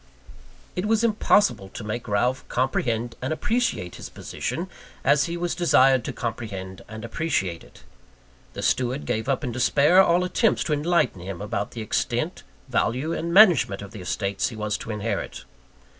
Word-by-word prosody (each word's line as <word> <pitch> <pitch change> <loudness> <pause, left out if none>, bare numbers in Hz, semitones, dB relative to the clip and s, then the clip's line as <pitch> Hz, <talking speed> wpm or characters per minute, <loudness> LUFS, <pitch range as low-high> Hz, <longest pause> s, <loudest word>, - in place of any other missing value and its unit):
It 180 +3 -1
was 225 +1 +2
impossible 205 - +2
to 110 - -8
make 110 +3 -4
Ralph 125 +6 +1
comprehend 120 -2 0
and 130 - -2
appreciate 185 - -1
his - - -8
position, 175 +4 -4 0.4
as 140 +2 +4
he 170 0 -4
was 175 0 -1
desired 135 -7 +4
to - - -2
comprehend 100 -5 -5
and 110 -1 -7
appreciate 95 - -2
it. - - -18 0.7
The - - -6
steward 130 +3 0
gave 110 +5 -2
up 135 0 0
in 125 - -2
despair 145 +8 +4
all 175 -1 +3
attempts 195 +5 +2
to 155 - -1
enlighten 150 - +1
him 90 -1 -6
about 105 0 -3
the 115 - -5
extent, 120 - -1 0.3
value, 130 +5 0
and 170 0 -3
management 170 - +6
of 100 - -10
the 105 - -9
estates 100 +1 -1
he 120 - -9
was 105 -1 -2
to - - -8
inherit. 105 -1 -3
125 Hz, 165 wpm, -24 LUFS, 105-170 Hz, 0.7 s, management